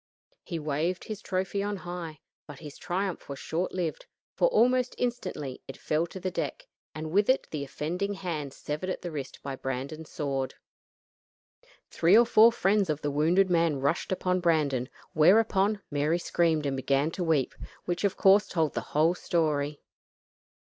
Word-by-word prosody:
He 170 - -5
waved 155 +4 -1
his 215 -2 -6
trophy 190 +1 -2
on 205 0 -2
high, 175 -4 -7 0.3
but 145 - -10
his 150 -1 -10
triumph 185 -1 -3
was 140 - -5
short 170 +6 -2
lived, 175 -4 -3 0.3
for - - +3
almost 255 - +3
instantly 185 - -3
it 135 - -8
fell 155 +3 0
to 190 - -9
the 185 0 -3
deck, - - -4 0.3
and 155 0 -5
with 205 +5 +3
it 260 - +3
the 150 -3 -3
offending 180 +8 -3
hand 160 -7 -4
severed 150 +7 -5
at - - -4
the 175 - -4
wrist 140 -4 -6
by 140 -1 -4
Brandon's 135 +5 -5
sword. 135 -3 -3 1.4
Three 175 +6 +5
or 240 - +7
four 225 0 +7
friends 200 -3 +2
of 155 0 -1
the 145 - 0
wounded 175 +6 +3
man 165 -3 +3
rushed 140 +8 0
upon 185 0 0
Brandon; 150 -7 +1 0.2
whereupon 200 +4 +4
Mary 150 +3 +1
screamed 165 -3 +1
and 140 -1 0
began 140 +3 +1
to 180 - -3
weep, 155 -6 +1 0.3
which 175 +2 -2
of 200 - +1
course 200 +1 +5
told 160 -5 0
the - - -2 0.2
whole 160 +3 +5
story. 150 -5 -1
170 Hz, 170 wpm, -28 LUFS, 150-190 Hz, 1.4 s, or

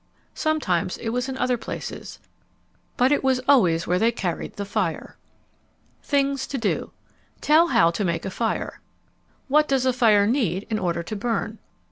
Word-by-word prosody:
Sometimes 210 - 0
it 225 - -4
was 250 +3 -2
in 260 - -4
other 250 -1 +1
places. - - -7 0.8
But 255 +2 +3
it 290 - +2
was 260 -1 +2
always 175 -13 +4
where 180 +1 +1
they 230 +3 +3
carried 185 -7 -4
the 200 - -4
fire. 200 - -3 0.9
THINGS 275 -2 0
TO 275 - -4
DO 225 -5 -2 0.5
Tell 315 +3 +4
how 170 - +4
to 185 +5 -2
make 170 -3 -1
a 190 - -3
fire. 225 +3 -3 0.7
_What 300 +2 +3
does 265 -2 +1
a 255 - +3
fire 220 -5 +4
need 210 - 0
in 215 - 0
order 170 -3 -1
to 215 - -6
burn? 225 0 -2
230 Hz, 165 wpm, -24 LUFS, 190-265 Hz, 0.9 s, always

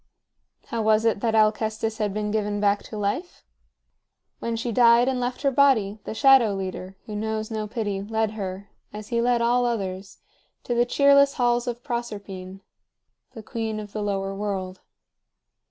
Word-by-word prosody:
How 230 - -2
was 220 +1 +3
it 225 -2 +2
that 225 +1 0
Alcestis 220 +1 +1
had 210 -2 0
been 210 +1 -2
given 210 -1 -1
back 205 0 +2
to 215 - -8
life? 210 - -3 0.9
When 230 0 -3
she 235 +1 -3
died 235 +1 +5
and 260 -1 0
left 250 +3 -3
her 275 - +3
body, 245 -7 +3
the - - -5
Shadow 260 -5 +5
Leader, 190 0 -5
who 215 -3 -7
knows 220 +1 -3
no 215 -1 -3
pity, 205 -3 -3
led 220 +1 -1
her, 195 -2 -6 0.2
as 210 0 -9
he 235 -1 +1
led 240 0 +2
all 245 +1 +3
others, 200 -4 -3 0.5
to 240 - -2
the 240 0 +2
cheerless 280 +1 +4
halls 240 -1 +1
of 240 0 -4
Proserpine, 200 -7 -6 0.7
the 225 - -8
queen 220 -1 -4
of 210 -1 -9
the 215 - -3
Lower 195 -1 -2
World. 195 -2 -4
220 Hz, 170 wpm, -24 LUFS, 205-240 Hz, 0.9 s, died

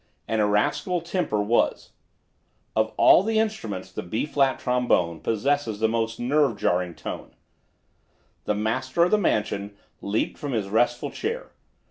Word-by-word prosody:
An 110 - 0
irascible 110 - +1
temper 170 - -1
was. 115 +3 +1 0.8
Of 110 0 +1
all 200 +5 +6
instruments 205 - -1
the - - -5
B 110 +9 -2
flat 140 -3 +1
trombone 120 -10 +1
possesses 115 - 0
the 110 - +3
most 115 0 -1
nerve 135 -2 +2
jarring 90 -2 0
tone. - - -7 1.1
The 105 - 0
master 130 +9 0
of 180 - +2
the 215 - +4
mansion 100 - -1 0.2
leaped 100 +2 -2
from 145 -3 -4
his 105 -4 -1
restful 120 +3 +1
chair. 465 +4 -4
115 Hz, 135 wpm, -25 LUFS, 105-145 Hz, 1.1 s, all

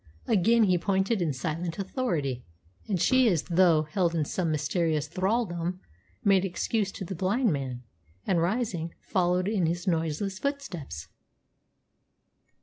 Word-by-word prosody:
Again 225 +3 +4
he 185 -4 +3
pointed 195 +3 +1
in 165 -3 +1
silent 165 +5 -3
authority, 170 - -2 0.4
and 195 -4 0
she 255 +7 +4
as 170 -6 +1
though 170 -3 +4
held 170 +2 0
in 155 -2 +1
some 170 +2 -1
mysterious 155 +1 0
thraldom, 185 -1 -1 0.4
made 195 -2 +4
excuse 195 +2 -1
to 190 - -6
the 190 - -5
blind 195 +4 +1
man, 130 -3 -4 0.4
and, 175 -3 +2
rising, 175 -4 -1
followed 180 0 +1
in 200 -6 +1
his 175 +3 -2
noiseless 175 +2 -1
footsteps. 185 - -4
180 Hz, 135 wpm, -28 LUFS, 160-195 Hz, 0.4 s, Again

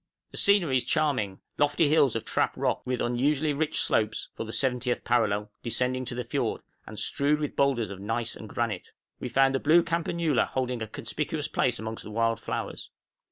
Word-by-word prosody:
The - - -6
scenery 180 -10 +4
is 125 - 0
charming, 130 -9 0 0.2
lofty 145 +2 +3
hills 145 -5 +4
of 115 - -3
trap - - 0
rock, - - 0
with 125 -1 -1
unusually 140 +5 +1
rich 155 +2 0
slopes 110 0 +1
(for - - -4
the 110 - -6
70th 125 -1 0
parallel) 105 -3 +1
descending 125 +2 -1
to 120 - -4
the 125 - -2
fiord, 115 - -2 0.2
and 110 - -9
strewed 145 +6 +1
with 150 -2 -3
boulders 120 -7 +1
of 100 - -7
gneiss 115 +3 -2
and 110 - -10
granite. 110 -6 -3 0.3
We 125 - -4
found 135 +2 +4
the 135 - +1
blue 170 +5 +5
campanula 170 -3 +1
holding 125 -2 -2
a 110 - -3
conspicuous - - -3
place - - +1
amongst 110 +1 -5
the - - -9
wild 115 +1 +1
flowers. - - -4
125 Hz, 190 wpm, -28 LUFS, 115-145 Hz, 0.3 s, blue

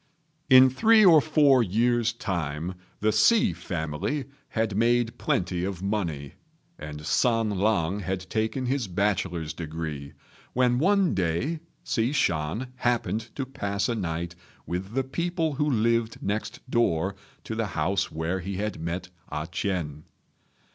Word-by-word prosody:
In 130 0 +8
three 220 - +5
or 165 -4 +8
four 145 -4 +4
years' 120 +3 +2
time 85 -4 -3 0.3
the 110 +1 +3
Hsi 230 - +4
family 90 - -3 0.2
had 110 -3 -1
made 120 +1 +2
plenty 90 -1 0
of 95 -1 -4
money, 85 -9 -2 0.5
and 75 0 -7
San 115 +6 +2
lang 100 -2 +1
had 95 -1 -3
taken 110 +4 -1
his 130 -3 0
bachelor's 90 -4 -1
degree, 80 -3 -5 0.4
when 125 -1 +3
one 195 +2 +3
day 95 - -1 0.2
Hsi 115 +4 0
Shan 100 - 0
happened 120 -2 0
to 135 - -2
pass 100 -6 -2
a 120 - 0
night 85 -5 -3 0.3
with 95 +4 -4
the 135 - +2
people 165 +3 -1
who 150 +2 0
lived 115 -2 +1
next 105 +5 -4
door 100 -7 +1 0.3
to - - -5
the 110 -1 -1
house 95 +5 0
where 80 +4 -2
he 95 +2 -5
had 105 +2 -3
met 85 +3 -4 0.2
A 75 +1 -3
ch'ien. 85 -4 -3
105 Hz, 140 wpm, -26 LUFS, 85-125 Hz, 0.5 s, In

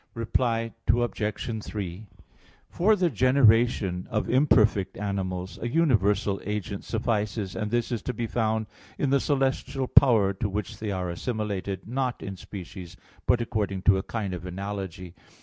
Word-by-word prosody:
Reply 115 0 0
Obj. 110 -2 0
3: 100 0 -5 0.6
For 210 +5 +4
the 180 -4 +1
generation 115 -7 +3
of 110 -3 -1
imperfect 110 -8 +3
animals, 95 -2 -3
a 120 - -1
universal 105 - +2
agent 105 -1 -4
suffices, 105 -4 -1
and 105 +2 -2
this 120 +2 0
is 115 -4 -1
to 125 - -3
be 115 - -2
found 110 -1 0 0.3
in 140 - 0
the 140 - +4
celestial 135 -1 0
power 110 -9 +5
to 100 +2 -2
which 105 +2 -4
they 110 - -3
are 90 -3 -2
assimilated, 100 -1 -3
not 125 +1 -2
in 100 -1 -5
species, 90 -1 -9 0.3
but 120 - +4
according 100 -5 -2
to 100 -2 +5
a - - -1
kind 100 -2 -4
of 90 -2 -5
analogy. 95 -1 -5
105 Hz, 150 wpm, -27 LUFS, 95-120 Hz, 0.6 s, power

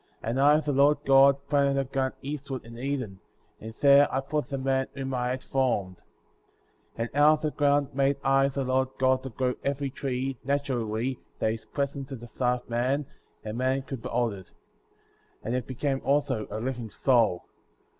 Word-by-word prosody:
And 120 +4 -1
I, 145 +2 +6
the 150 -1 -2
Lord 140 +2 +4
God, 135 0 +6
planted 140 -1 +2
a - - +1
garden 135 0 -2
east 145 0 -5
ward 130 -3 -5
in 115 0 -11
Eden,^ 130 -8 -3 0.4
and 110 - -6
there 140 0 +6
I 135 - 0
put 140 0 -3
the 140 - -3
man 135 0 0
whom 135 -1 -4
I 125 -1 -1
had 130 +1 -3
formed. 105 -9 -1 1.0
9. 115 - -1
And - - -14
out 150 +1 +6
of 155 - -2
the 155 - -1
ground 145 -1 +1
made 140 +1 +2
I, 135 +1 +4
the 140 -1 -3
Lord 130 +1 +1
God, 130 0 +2
to 130 - -6
grow 125 +2 -1
every 140 0 -2
tree, 130 -1 -3
naturally,* 130 -3 -1 0.2
that 110 - 0
is 115 - -8
pleasant 140 -1 -3
to 135 - -6
the 120 -1 -10
sight 125 +1 -1
of - - -30
man; 130 +5 0 0.4
and 110 +2 -5
man 130 +1 +1
could 135 -3 -7
behold 120 -2 -1
it. 95 -2 -12 0.9
And 115 - -3
it 125 -1 -2
became 135 +1 -2
also 135 -6 0
a 105 - -4
living 120 -1 -4
soul. 115 -4 +2
135 Hz, 195 wpm, -27 LUFS, 125-140 Hz, 1.0 s, I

